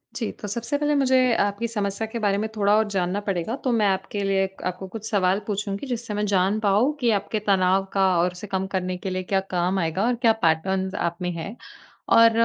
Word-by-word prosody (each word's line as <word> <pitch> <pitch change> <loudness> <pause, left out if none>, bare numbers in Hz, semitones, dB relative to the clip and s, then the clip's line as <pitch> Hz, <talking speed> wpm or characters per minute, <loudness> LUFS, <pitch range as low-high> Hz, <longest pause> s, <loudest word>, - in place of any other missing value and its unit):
जी, 230 -4 -2
तो 205 - -8
सबसे 235 +7 -2
पहले 295 0 +1
मुझे 260 -2 +3 0.3
आपकी 205 +3 -2
समस्या 205 -1 -2
के 230 +1 -5
बारे 200 -2 +1
में 215 +2 -1
थोड़ा 205 0 +3
और 220 -1 +2
जानना 190 0 -1
पड़ेगा, 195 +3 -2
तो 265 -3 -2
मैं 215 -3 +3
आपके 195 +1 -1
लिए 195 0 +2 0.2
आपको 185 +1 -4
कुछ 220 +2 -7
सवाल 195 -1 +2
पूछूँगी। 205 +4 -3
जिससे 235 -3 -4
मैं 210 0 -1
जान 195 +1 +2
पाऊँ 215 +8 +2
कि 240 -2 +2
आपके 210 +1 -1
तनाव 190 0 +3
का 195 -1 +3
और 180 +1 +2
उसे 180 +4 -9
कम 190 0 -2
करने 185 0 -1
के 190 - -5
लिए 185 0 -2
क्या 195 +1 +1 0.2
काम 180 +2 +1
आएगा 165 +4 0
और 245 0 +2
क्या 225 - +7
पैटर्न 190 +4 +1
आप 170 0 -1
में 180 0 -1
है। 170 +7 -6 0.6
और 230 0 +7
200 Hz, 220 wpm, -24 LUFS, 190-220 Hz, 0.6 s, क्या